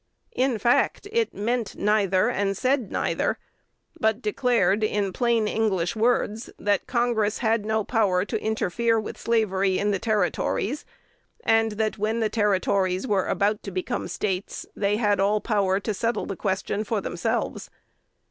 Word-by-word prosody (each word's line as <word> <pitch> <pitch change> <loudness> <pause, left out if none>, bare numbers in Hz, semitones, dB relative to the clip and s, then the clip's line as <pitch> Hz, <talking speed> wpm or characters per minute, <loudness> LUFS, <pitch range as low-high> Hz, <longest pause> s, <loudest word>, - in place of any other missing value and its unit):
In 255 -3 +1
fact, 240 - +1
it 460 -1 +1
meant 230 0 -2
neither, 200 -3 +2
and 195 -1 0
said 255 -4 0
neither, - - 0 0.6
but 220 0 +2
declared, 215 -3 +1
in 205 -3 0
plain 235 -2 +1
English 200 -6 0
words, 225 -1 0
that 205 0 0
Congress 235 -4 +1
had 220 -2 0
no 220 0 +1
power 200 -5 +1
to 220 0 -3
interfere 220 +1 +1
with 215 - -6
slavery 195 -5 +1
in 205 0 +1
the 195 - 0
Territories; 215 +5 -1 0.6
and 225 -1 +3
that, 215 0 -2
when 220 +2 0
the 220 -2 +1
Territories 195 -3 +1
were 200 -6 +1
about 210 +1 +1
to - - -6
become 185 -1 -3
States, 190 -2 -3
they 205 0 +1
had 210 -3 +2
all 205 +2 +2
power 200 -3 +1
to 215 +1 -3
settle 230 +4 -1
the 195 - -4
question 190 +2 -2
for 220 0 -1
themselves. 220 +5 -2
210 Hz, 150 wpm, -25 LUFS, 195-225 Hz, 0.6 s, and